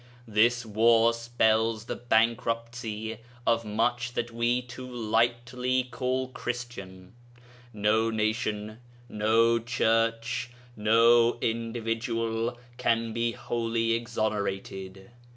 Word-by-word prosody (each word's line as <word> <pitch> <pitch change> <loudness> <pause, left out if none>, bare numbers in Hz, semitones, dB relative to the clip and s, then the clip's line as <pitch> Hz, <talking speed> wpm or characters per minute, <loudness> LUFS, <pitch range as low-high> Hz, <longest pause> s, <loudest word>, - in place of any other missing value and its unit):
This 115 +3 +3
war 115 +2 +4
spells 115 -1 +1
the - - -4
bankruptcy 115 -1 -1 0.3
of 115 0 +2
much 120 +3 -1
that 120 -1 -2
we 120 +1 +1
too 125 +1 -9
lightly 120 +2 0
call 130 +1 -1
Christian. 120 -8 -6 0.6
No 110 +1 +2
nation, 110 -1 -2 0.3
no 115 +2 +3
Church, 115 +1 0 0.3
no 115 +2 +4
individual 115 0 -2 0.2
can 115 -1 0
be 115 0 0
wholly 115 -2 -1
exonerated. 100 -4 -3
115 Hz, 90 wpm, -28 LUFS, 110-120 Hz, 0.6 s, war